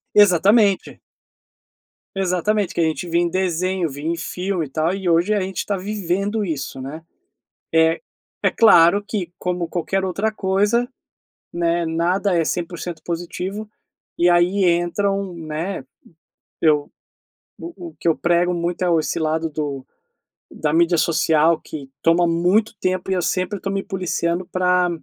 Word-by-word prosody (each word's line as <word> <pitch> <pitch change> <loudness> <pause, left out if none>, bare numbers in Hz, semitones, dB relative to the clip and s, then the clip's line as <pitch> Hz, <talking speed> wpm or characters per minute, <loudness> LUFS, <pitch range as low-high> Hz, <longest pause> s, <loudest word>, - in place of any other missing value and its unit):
Exatamente! 205 +1 +4 1.2
Exatamente, 195 +2 0
o - - -18
que - - -1
a - - +4
gente 160 +2 -2
via 170 +1 +2
em 175 - +1
desenho, 185 0 0
via 145 +2 -7
em 170 +1 0
filme 180 0 -3
e - - -12
tal, 160 +6 0
e 195 -2 -3
hoje 170 +5 +3
a 205 - +1
gente 190 -1 -4
está 200 - -1
vivendo 200 +2 -2
isso, 145 -6 -4
né. 145 +5 -7 0.7
É 160 0 +3 0.4
é - - +3
claro 200 -3 +6
que 185 -6 -4
como 180 -1 -2
qualquer 190 +3 -1
outra 195 +4 -1
coisa, 210 +5 +1 0.6
né, 170 0 0
nada 175 +5 0
é 165 - +2
100% 175 -1 -4
positivo, 180 +5 -4 0.5
e 175 +1 +4
aí 180 +3 +3
entram, 185 +2 0
né, 165 +3 -4 0.8
eu 150 -2 +2 0.7
o 340 0 -8
o - - -22
que - - 0
eu 160 - +3
prego 175 +1 +2
muito 170 +1 -2
é 180 - +2
o 165 - +4
esse 155 - -2
lado 160 0 0
do 145 -3 -4 0.6
da 150 -1 -2
mídia 170 +1 +3
social 160 0 +3
que 140 -4 -9
toma 170 +1 +4
muito 180 +7 +2
tempo 185 0 -1
e - - +2
eu 180 - 0
sempre 185 +4 -1
estou 195 +1 -4
me 195 0 -1
policiando 180 -3 -2
pra 180 -1 +2
175 Hz, 155 wpm, -21 LUFS, 165-195 Hz, 1.2 s, claro